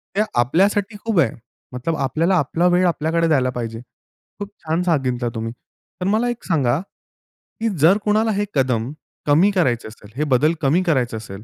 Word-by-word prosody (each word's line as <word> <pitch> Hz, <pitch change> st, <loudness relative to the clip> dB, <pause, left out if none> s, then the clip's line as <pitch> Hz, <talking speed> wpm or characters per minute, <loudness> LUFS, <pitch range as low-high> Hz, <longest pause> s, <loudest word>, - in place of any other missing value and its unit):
ते 205 Hz, -, +3 dB, 0.2 s
आपल्यासाठी 195 Hz, -, +2 dB
खूप 220 Hz, -6 st, +1 dB
आहे. -, -, +3 dB, 0.4 s
मतलब 130 Hz, +7 st, -2 dB
आपल्याला 160 Hz, +7 st, +1 dB
आपला 165 Hz, +6 st, +1 dB
वेळ 180 Hz, +1 st, +3 dB
आपल्याकडे 165 Hz, 0 st, 0 dB
द्यायला 135 Hz, -5 st, +2 dB
पाहिजे. 115 Hz, -2 st, -5 dB, 0.6 s
खूप 205 Hz, 0 st, -5 dB, 0.2 s
छान 160 Hz, +2 st, 0 dB
सांगितलं 130 Hz, -8 st, 0 dB
तुम्ही. 115 Hz, 0 st, -3 dB, 0.5 s
तर -, -, -1 dB
मला 220 Hz, +4 st, +1 dB
एक 240 Hz, -1 st, -5 dB
सांगा, 140 Hz, -6 st, +1 dB, 0.8 s
की 225 Hz, 0 st, 0 dB
जर 165 Hz, +7 st, +5 dB
कोणाला 215 Hz, +1 st, +2 dB
हे 205 Hz, +1 st, 0 dB
कदम 125 Hz, -3 st, 0 dB, 0.3 s
कमी 160 Hz, +8 st, +4 dB
करायचं 130 Hz, -, 0 dB
असेल, 110 Hz, -1 st, -14 dB
हे 150 Hz, -, -1 dB
बदल 145 Hz, +3 st, +2 dB
कमी 155 Hz, +6 st, +3 dB
करायचे 130 Hz, -9 st, 0 dB
असेल 105 Hz, -2 st, -9 dB
155 Hz, 170 wpm, -21 LUFS, 125-185 Hz, 0.8 s, जर